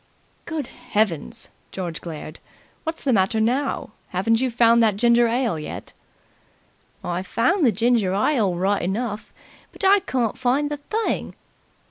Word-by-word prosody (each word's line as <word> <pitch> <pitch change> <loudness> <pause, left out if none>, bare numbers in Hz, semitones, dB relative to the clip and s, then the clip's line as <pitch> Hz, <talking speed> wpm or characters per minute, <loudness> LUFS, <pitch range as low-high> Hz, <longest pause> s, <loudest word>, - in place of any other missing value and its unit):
"Good 320 -4 -3
Heavens!" 220 - -2 0.2
George 175 -3 -5
glared. 155 -2 -8 0.5
"What's 320 +1 -4
the 265 - +2
matter 200 +2 +2
now? 250 +2 0 0.2
Haven't 225 +6 +1
you 260 - +1
found 235 0 +4
that 215 -3 +3
ginger 235 +1 +4
ale 230 -7 0
yet?" 150 - -7 1.1
"I've 180 +2 -3
found 335 - +1
the 245 - +5
ginger 225 -2 +2
ile 210 -4 +2
right 195 +3 +1
enough, 210 +4 -3 0.4
but 390 - -5
I 400 +1 +6
can't 245 - -2
find 270 +4 +1
the 295 - -2
thing." 435 +10 -2
230 Hz, 140 wpm, -23 LUFS, 195-260 Hz, 1.1 s, I